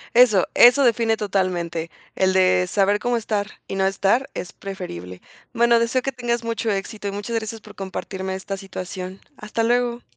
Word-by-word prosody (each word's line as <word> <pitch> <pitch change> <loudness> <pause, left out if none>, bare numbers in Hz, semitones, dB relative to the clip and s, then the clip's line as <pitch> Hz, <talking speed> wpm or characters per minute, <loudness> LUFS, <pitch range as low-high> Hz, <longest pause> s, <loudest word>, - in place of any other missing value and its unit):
Eso, 230 -6 +6
eso 250 +4 +7
define 230 -2 +3
totalmente, 180 -5 -1 0.3
el 190 0 +2
de 185 -1 +3
saber 200 +2 +2
cómo 240 +1 0
estar 210 -2 -1 0.2
y - - -6
no 190 0 +1
estar, 200 +7 +1
es 180 - -5
preferible. 90 - -7 0.3
Bueno, 235 0 +4
deseo 240 +2 +1
que 270 - -1
tengas 240 -2 -2
mucho 230 0 -2
éxito, 205 +1 -4
y 200 - -2
muchas 205 +3 -4
gracias 225 0 -4
por - - -13
compartirme 190 0 -5
esta 190 +1 -5
situación. 185 -1 -7 0.2
Hasta 215 +2 -2
luego. 240 0 +1
205 Hz, 170 wpm, -22 LUFS, 190-235 Hz, 0.3 s, eso